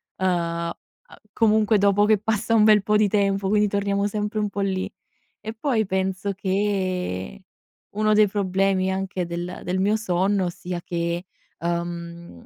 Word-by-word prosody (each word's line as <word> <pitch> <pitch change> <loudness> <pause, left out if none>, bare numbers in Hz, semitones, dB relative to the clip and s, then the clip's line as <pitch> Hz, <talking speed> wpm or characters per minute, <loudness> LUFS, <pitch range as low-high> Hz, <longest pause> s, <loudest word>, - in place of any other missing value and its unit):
Uhm, 190 - -1
uhm, 170 -1 -1 0.6
comunque 215 0 +3
dopo 200 +1 +3
che 215 0 +4
passa 220 +2 0
un 215 - +5
bel 215 -1 +6
po' 210 +2 +1
di 210 -1 +3
tempo 195 -1 +1
quindi 210 0 +3
torniamo 200 0 0
sempre 210 +1 -2
un 210 -1 0
po' 200 - -4
lì. 190 -1 -1 0.5
E 220 - -6
poi 225 -4 0
penso 190 +1 -1
che 185 - -2 0.5
uno 215 0 +2
dei 210 0 +5
problemi 190 -1 0
anche 190 -1 -2
del 175 +1 -5
del 185 +1 -1
mio 205 +3 +2
sonno 190 -2 0
sia 175 +1 -6
che, 170 +1 -2 0.4
uhm, 170 - -5
195 Hz, 155 wpm, -23 LUFS, 180-210 Hz, 0.6 s, bel